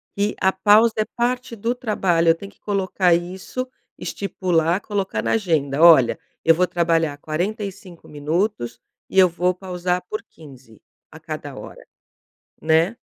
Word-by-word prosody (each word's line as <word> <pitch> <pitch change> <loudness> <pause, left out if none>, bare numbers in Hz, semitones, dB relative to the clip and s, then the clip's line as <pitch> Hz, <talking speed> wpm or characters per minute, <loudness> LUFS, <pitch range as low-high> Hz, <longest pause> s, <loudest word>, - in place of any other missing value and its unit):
que 205 +1 0
a 190 - +3
pausa 210 +4 +5
é 215 - +1
parte 245 0 -1
do 230 +4 -1
trabalho. 185 -8 +1
Eu 165 - +5
tenho 200 +3 -10
que - - -30
colocar 190 -3 +1
isso, 185 +9 -3 0.3
estipular, 180 -3 -1
colocar 195 - -3
na 115 - -1
agenda: 155 -8 0
"Olha, 155 -8 +7 0.3
eu 165 0 +6
vou 180 +2 +3
trabalhar 165 -4 0
45 190 +3 -5
minutos, 150 - -2 0.3
e 190 - +2
eu 185 - +8
vou 180 +1 0
pausar 180 -1 -3
por 215 - -4
15 130 - -16 0.3
a - - -12
cada - - -7
hora", - - -11 0.8
né. 165 +7 +2
180 Hz, 145 wpm, -22 LUFS, 165-205 Hz, 0.8 s, eu